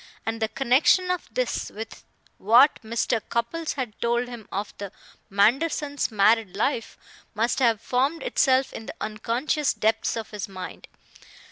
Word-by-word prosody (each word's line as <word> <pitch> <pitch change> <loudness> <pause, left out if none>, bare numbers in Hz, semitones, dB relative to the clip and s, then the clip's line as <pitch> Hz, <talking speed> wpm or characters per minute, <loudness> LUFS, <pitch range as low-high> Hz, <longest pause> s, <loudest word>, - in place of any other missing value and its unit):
And 225 0 -3
the 220 - +2
connection 270 - +3
of 360 - -4
this - - -2
with 220 +1 -9 0.4
what 240 +8 +5
Mr. 230 0 0
Cupples 300 +8 -2
had 255 -6 -4
told 240 +1 +1
him 235 -3 -9
of 200 +2 -4
the 200 -2 -6 0.4
Mandersons' 275 +8 +1
married 215 -1 +3
life 230 +1 -1 0.4
must 230 +4 +1
have 230 -5 +3
formed 270 +8 0
itself 265 -1 +2
in 225 - -8
the - - -7
unconscious 240 +7 -1
depths 220 +1 +1
of 220 -1 -6
his 205 -2 -5
mind. 185 -1 -8
235 Hz, 145 wpm, -25 LUFS, 220-270 Hz, 0.4 s, what